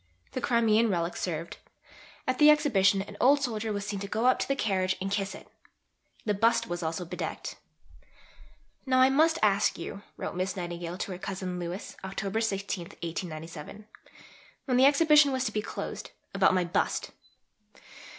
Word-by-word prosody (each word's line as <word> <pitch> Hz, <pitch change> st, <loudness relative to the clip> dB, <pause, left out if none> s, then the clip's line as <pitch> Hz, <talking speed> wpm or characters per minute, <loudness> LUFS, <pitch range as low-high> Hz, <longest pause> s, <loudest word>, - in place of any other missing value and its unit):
The 255 Hz, -, -4 dB
Crimean 230 Hz, -1 st, +3 dB
relic 175 Hz, -2 st, -1 dB
served. 165 Hz, -1 st, -4 dB, 0.7 s
At 255 Hz, 0 st, 0 dB
the 300 Hz, 0 st, +8 dB
Exhibition 200 Hz, -11 st, +4 dB
an 205 Hz, +1 st, -11 dB
old 280 Hz, +2 st, +5 dB
soldier 220 Hz, -3 st, -2 dB
was 200 Hz, -1 st, -3 dB
seen 205 Hz, -1 st, -3 dB
to 200 Hz, -, -5 dB
go 220 Hz, +4 st, -1 dB
up 255 Hz, -, +4 dB
to -, -, -1 dB
the 275 Hz, -, +1 dB
carriage 190 Hz, -5 st, 0 dB
and 195 Hz, +1 st, -3 dB
kiss 195 Hz, -1 st, -1 dB
it. -, -, -13 dB, 0.8 s
The 210 Hz, -, +1 dB
bust 230 Hz, +3 st, +2 dB
was 175 Hz, -5 st, -4 dB
also 165 Hz, +2 st, -3 dB
bedecked. 180 Hz, +2 st, -5 dB, 1.3 s
"Now 255 Hz, 0 st, +3 dB
I 260 Hz, +1 st, +6 dB
must 320 Hz, +4 st, +4 dB
ask 205 Hz, 0 st, +3 dB
you," 185 Hz, +4 st, -7 dB, 0.2 s
wrote -, -, -4 dB
Miss 185 Hz, +1 st, -2 dB
Nightingale 175 Hz, -1 st, -5 dB
to 195 Hz, -, -4 dB
her 180 Hz, -, -6 dB
cousin 185 Hz, -2 st, -4 dB
Louis 175 Hz, +2 st, -6 dB
(Oct. 195 Hz, +3 st, -2 dB
16, 195 Hz, -4 st, -2 dB
1897), 165 Hz, +3 st, -7 dB, 0.8 s
when 255 Hz, -3 st, +1 dB
the 260 Hz, -, +6 dB
Exhibition 295 Hz, 0 st, +6 dB
was 260 Hz, -1 st, -1 dB
to 215 Hz, -, -1 dB
be 215 Hz, -, -1 dB
closed, -, -, -6 dB, 0.2 s
"about 195 Hz, -1 st, +4 dB
my 180 Hz, -, +2 dB
bust. 170 Hz, -, -1 dB
200 Hz, 170 wpm, -28 LUFS, 180-235 Hz, 1.3 s, the